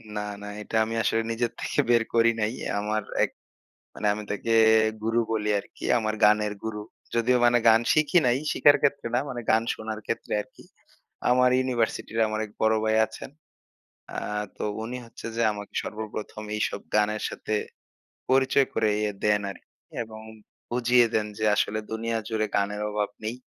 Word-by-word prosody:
না, 105 - -1 0.2
না। 105 - -7
এটা 105 - -6
আমি 115 - -5
আসলে 115 - +2
নিজের 115 +1 -1
থেকে - - -2
বের 120 -1 +5
করি 115 0 +5
নাই। 105 +2 0 0.3
আমার 105 +1 -1 0.2
এক - - 0 0.6
মানে 105 - -3
আমি 105 - -6
তাকে 105 +3 -2 0.5
গুরু 115 +2 +1
বলি 105 -1 -1
আরকি। - - -10
আমার 110 -1 -1
গানের 105 0 +4
গুরু। 105 -1 -4 0.3
যদিও 120 +2 +3
মানে 120 0 +5
গান 110 0 +7
শিখি 155 +3 +4
নাই, 125 +1 +3
শিখার 145 - +6
ক্ষেত্রে 140 -3 +1
না 120 - +3
মানে 125 -2 -4
গান 110 0 +4
শোনার 110 -1 -6
ক্ষেত্রে 115 - -4
আরকি। - - -19 0.7
আমার 125 0 +5
ইউনিভার্সিটি 125 -3 -1
র - - +2
আমার 110 0 -2
এক 105 - -15
বড় 110 0 +4
ভাই 110 0 +2
আছেন। 110 - -10 0.8
অ্যা - - -4 0.4
তো - - -4 0.2
উনি 120 +3 -5
হচ্ছে 115 0 -10
যে 115 - +1
আমাকে 105 -1 -8
সর্বপ্রথম 105 0 -6
এইসব 105 - -1
গানের 105 0 +2
সাথে 110 - -4 0.8
পরিচয় 135 +1 +4
করিয়ে 105 -1 +1
দেন 105 -1 +3
আরকি, - - -16 0.3
এবং 110 -1 -11 0.5
বুঝিয়ে 120 0 +4
দেন 110 - +2
যে 110 - -1
আসলে 110 +1 0
দুনিয়া 115 +1 -1
জুড়ে 110 -2 -1
গানের 100 +1 0
অভাব 105 0 -1
নেই। 110 +2 -3
110 Hz, 170 wpm, -26 LUFS, 105-120 Hz, 0.8 s, গান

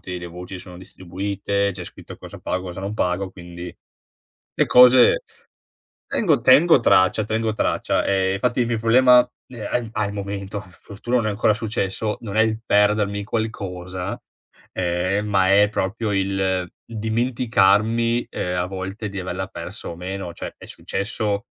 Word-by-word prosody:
delle 90 -1 -6
voci, 90 +2 -8
sono 90 0 -11
distribuite, 100 +2 -3
c'è 90 0 -8
scritto - - -11
cosa - - -11
pago, 90 0 -3
cosa 90 +1 -6
non 100 +2 -4
pago, 95 -1 -1
quindi 85 -1 -9 0.8
le - - +2
cose 125 - +7 0.8
tengo 165 -10 +1
tengo 140 +2 +6
traccia 95 0 +4
tengo 110 +1 -1
traccia. - - 0
Ehm, 95 0 +1
fatti 125 +2 0
il 120 - +2
mio 115 -1 0
problema, 125 +2 +5 0.3
ne 110 -3 -7
a 120 +2 -1
al 105 -2 -1
momento, 100 0 -5 0.2
fortuna 115 +4 -4
non 115 -3 0
è - - +1
ancora 105 +1 +2
successo, 105 0 -2
non 105 -3 -7
è 110 - +5
il 110 0 +1
perdermi 105 0 +2
qualcosa. 95 -5 -4 0.6
Eh, 90 +2 0
ma 100 -2 +2
è 105 +1 +5
proprio 105 +2 -2
il 95 -2 0 0.2
dimenticarmi, 115 0 +1
ehm, 90 0 -3
a 90 - 0
volte 95 +3 -5
di 100 -1 -6
averla 90 - -4
persa - - -8
o 85 - -6
meno. 90 0 -6
Cioè - - -7
è - - -12
successo 105 +1 -3
100 Hz, 155 wpm, -22 LUFS, 95-110 Hz, 0.8 s, cose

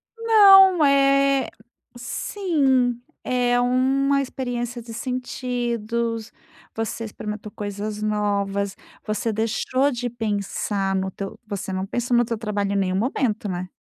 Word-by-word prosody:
Não, 390 -6 +7
eh, 275 -1 +3 0.5
sim, 265 - 0 0.2
é 245 -1 +1
uma 270 +3 +2
experiência 245 -2 -4
de 230 0 -10
sentidos, 235 -2 -3 0.4
você 225 +1 -3
experimentou 210 0 -7
coisas 205 +1 -5
novas, 200 -2 -1 0.3
você 215 +1 -1
deixou 255 +5 0
de 245 -1 -3
pensar 205 -3 -2
no 190 0 -1
teu 195 +1 -7
você 195 -2 -5
não 190 0 -2
pensou 240 +4 -1
no 240 - +5
teu 230 -1 -3
trabalho 205 -2 -2
em - - -1
nenhum 185 -2 0
momento, 220 -1 -1
né. 180 0 -4
235 Hz, 120 wpm, -23 LUFS, 210-255 Hz, 0.5 s, Não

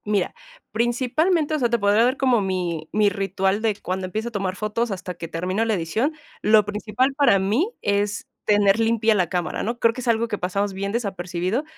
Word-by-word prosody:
Mira, 205 -3 0 0.4
principalmente, 275 +8 +1
o 305 - +1
sea, 240 -3 +2
te 235 - +2
podría 205 +1 +3
dar 255 +3 +2
como 255 -5 +3
mi 175 -5 -2
mi 210 -1 +3
ritual 195 +1 -1
de 220 -2 +1
cuando 185 -1 -4
empiezo 220 +5 -3
a - - -18
tomar 195 -3 -2
fotos, 215 +3 -2
hasta 185 -2 -5
que 170 -1 -7
termino 180 +6 -1
la 225 -2 +1
edición. 215 - -1 0.3
Lo 215 -1 +5
principal 215 +6 -1
para 280 -8 +4
mí 220 - +1
es 205 0 0 0.2
tener 205 0 +4
limpia 225 0 +3
la 180 -5 +1
cámara, 180 -2 -2
¿no?, 235 +2 -2
creo 230 -1 +3
que 255 - -6
es 245 - -7
algo 230 0 +2
que 210 -2 -4
pasamos 195 +2 -1
bien 200 +1 -3
desapercibido, 190 - -2
210 Hz, 205 wpm, -23 LUFS, 190-235 Hz, 0.4 s, Lo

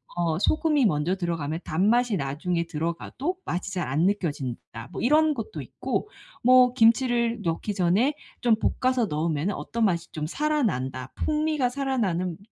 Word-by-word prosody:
어 170 -2 0
소금이 300 - +2
먼저 160 0 +1
들어가면 165 -3 -2
단맛이 215 +7 +2
나중에 165 +3 -1
들어가도 170 - -3
맛이 185 +2 -3
잘 180 -3 -1
안 155 +7 +2
느껴진다. 140 - -3
뭐 - - -4
이런 305 +4 +4
것도 225 -6 -6
있고 - - -3 0.3
뭐 255 0 +6
김치를 235 0 +3
넣기 170 +5 -2
전에 195 - +2 0.3
좀 235 -2 +4 0.3
볶아서 255 -2 +2
넣으면은 160 +3 -1
어떤 230 0 -3
맛이 170 -3 0
좀 155 -1 -3
살아난다. 155 - -1
풍미가 305 -3 0
살아나는 215 - -1
195 Hz, 320 characters per minute, -26 LUFS, 165-250 Hz, 0.3 s, 뭐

